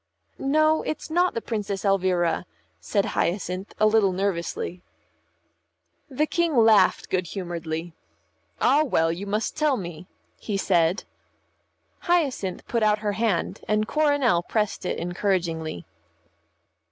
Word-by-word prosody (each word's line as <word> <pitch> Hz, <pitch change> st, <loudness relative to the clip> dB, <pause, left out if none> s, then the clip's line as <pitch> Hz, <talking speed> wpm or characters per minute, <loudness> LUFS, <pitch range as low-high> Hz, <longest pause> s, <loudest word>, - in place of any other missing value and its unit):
"No, 310 Hz, +3 st, +3 dB
it's 310 Hz, -, -5 dB
not 355 Hz, +2 st, +2 dB
the 230 Hz, -, -3 dB
Princess 205 Hz, -3 st, -3 dB
Elvira," 185 Hz, -3 st, +1 dB, 0.3 s
said 200 Hz, -2 st, 0 dB
Hyacinth, 185 Hz, +1 st, -2 dB
a 215 Hz, -, +4 dB
little 215 Hz, -2 st, +4 dB
nervously. 180 Hz, -1 st, -2 dB, 1.3 s
The 290 Hz, +3 st, +1 dB
King 335 Hz, -3 st, 0 dB
laughed 220 Hz, -4 st, +5 dB
good 185 Hz, -2 st, 0 dB
humouredly. 170 Hz, -2 st, -5 dB, 0.7 s
"Ah, 285 Hz, +4 st, +4 dB
well, 165 Hz, -, +1 dB
you 185 Hz, +5 st, -5 dB
must 215 Hz, +2 st, -1 dB
tell 300 Hz, -4 st, +2 dB
me," 175 Hz, -2 st, -7 dB, 0.3 s
he 205 Hz, -3 st, -3 dB
said. 175 Hz, -1 st, +2 dB, 1.0 s
Hyacinth 280 Hz, -, 0 dB
put 235 Hz, -, 0 dB
out 210 Hz, -1 st, +3 dB
her 205 Hz, -, +2 dB
hand, 205 Hz, -3 st, -1 dB
and 215 Hz, 0 st, +1 dB
Coronel 285 Hz, -, +2 dB
pressed 210 Hz, 0 st, -2 dB
it -, -, -2 dB
encouragingly. 170 Hz, -, -2 dB
200 Hz, 120 wpm, -25 LUFS, 175-235 Hz, 1.3 s, laughed